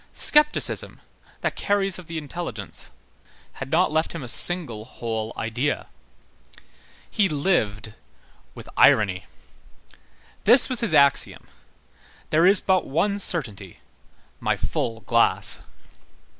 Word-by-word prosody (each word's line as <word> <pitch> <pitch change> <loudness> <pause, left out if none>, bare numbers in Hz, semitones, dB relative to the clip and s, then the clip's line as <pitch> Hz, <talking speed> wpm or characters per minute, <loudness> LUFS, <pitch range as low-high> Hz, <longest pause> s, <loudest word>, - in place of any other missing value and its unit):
Scepticism, 300 0 +3 0.4
that - - -3
caries 195 -2 -1
of 180 - -13
the 165 - -6
intelligence, 145 - -6 0.7
had 135 - -6
not 170 +3 +1
left 160 +1 -1
him 165 -4 -7
a - - -8
single 125 -6 +1
whole 110 -2 -6
idea. 120 +6 -3 1.2
He 205 -4 0
lived 110 - -2 0.6
with - - -12
irony. 95 -4 +3 1.2
This 245 +6 +5
was 255 - +1
his 230 - 0
axiom: 140 -1 +3 0.9
"There 165 +3 +3
is 195 +1 +7
but 190 -2 0
one 200 +8 -1
certainty, 110 - -2 0.6
my - - -1
full 115 -1 -4
glass." 100 -2 +2
150 Hz, 110 wpm, -23 LUFS, 110-185 Hz, 1.2 s, is